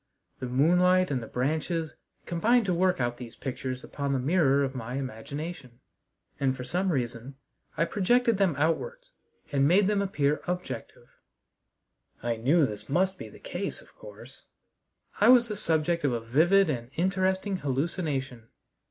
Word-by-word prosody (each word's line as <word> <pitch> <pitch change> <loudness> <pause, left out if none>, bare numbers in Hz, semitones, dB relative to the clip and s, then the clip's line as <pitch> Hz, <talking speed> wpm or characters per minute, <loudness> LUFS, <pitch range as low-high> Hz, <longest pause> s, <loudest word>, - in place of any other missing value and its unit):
The 130 - -4
moonlight 180 +7 +3
and 130 -3 -1
the 115 - -7
branches 155 +5 -2 0.3
combined 225 +7 +2
to 185 - +1
work 180 +1 +2
out 120 -1 -1
these 120 -2 -9
pictures 130 -1 -5
upon 140 -1 -3
the 135 - +1
mirror 140 -1 +3
of 135 -1 -2
my 125 -1 -5
imagination, 135 +1 -6 0.6
and 135 -1 +1
for 125 - -5
some 180 +8 -1
reason 125 -1 -3 0.4
I 165 - +3
projected 230 +4 +2
them 190 -6 +2
outwards 485 - -1 0.4
and 140 -1 +3
made 190 +5 +5
them 205 0 +1
appear 150 -7 0
objective. 180 0 -5 1.2
I 120 -1 -1
knew 140 +8 +3
this 105 -2 -7
must 185 +5 +1
be - - -7
the - - -14
case, - - -5
of - - -19
course. - - -13 0.7
I - - +5
was 245 -1 +7
the 210 - -4
subject 170 -1 0
of 140 -4 +2
a 120 - -1
vivid 165 +12 +3
and 120 -6 -3
interesting 190 +2 0
hallucination. 135 -5 -3
155 Hz, 155 wpm, -28 LUFS, 130-185 Hz, 1.2 s, was